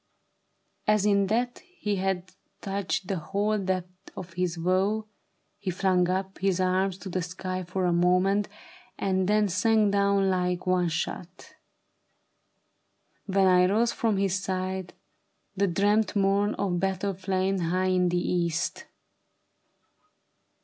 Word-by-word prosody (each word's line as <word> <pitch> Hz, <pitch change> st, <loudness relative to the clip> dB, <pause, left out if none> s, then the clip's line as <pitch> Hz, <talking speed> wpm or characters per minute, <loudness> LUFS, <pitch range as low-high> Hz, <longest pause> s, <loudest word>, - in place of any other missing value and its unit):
" -, -, -47 dB
As 210 Hz, -1 st, +3 dB
in 200 Hz, -1 st, +3 dB
that 240 Hz, +4 st, -1 dB
He 360 Hz, -, -4 dB
had 185 Hz, -1 st, -2 dB, 0.3 s
touched 195 Hz, -1 st, -2 dB
the 195 Hz, -, -1 dB
whole 205 Hz, +5 st, -1 dB
depth 185 Hz, -1 st, -4 dB
of 180 Hz, -2 st, -8 dB
his 180 Hz, -1 st, -2 dB
woe, 190 Hz, +5 st, +1 dB, 0.5 s
he 195 Hz, -, -3 dB
flung 185 Hz, 0 st, +2 dB
uj) 190 Hz, +1 st, -2 dB
His 190 Hz, -1 st, +1 dB
arms 185 Hz, 0 st, +1 dB
to 190 Hz, 0 st, -8 dB
the 185 Hz, 0 st, -2 dB
sky 185 Hz, +1 st, -4 dB
for 185 Hz, +1 st, -2 dB
a 175 Hz, -, +2 dB
moment, 185 Hz, +4 st, +2 dB, 0.5 s
and 190 Hz, -1 st, 0 dB
then 210 Hz, 0 st, +3 dB
Sank 210 Hz, +2 st, +2 dB
down 200 Hz, -1 st, +2 dB
like 180 Hz, -1 st, -1 dB
one 180 Hz, -1 st, +2 dB
shot. 180 Hz, -, -5 dB, 1.7 s
When 195 Hz, -1 st, +3 dB
I 180 Hz, -1 st, +5 dB
rose 225 Hz, +5 st, +2 dB
from 225 Hz, -3 st, 0 dB
his 195 Hz, -1 st, +1 dB
side, 185 Hz, -1 st, -3 dB, 0.6 s
The 200 Hz, +1 st, +2 dB
dread 205 Hz, +4 st, +1 dB
morn 200 Hz, +1 st, +2 dB
of 180 Hz, -3 st, -1 dB
battle 195 Hz, +1 st, -1 dB
flamed 190 Hz, 0 st, -1 dB
high 185 Hz, +3 st, 0 dB
in 180 Hz, -1 st, +2 dB
the 175 Hz, -, 0 dB
East. 170 Hz, -2 st, -1 dB
190 Hz, 135 wpm, -27 LUFS, 180-200 Hz, 1.7 s, I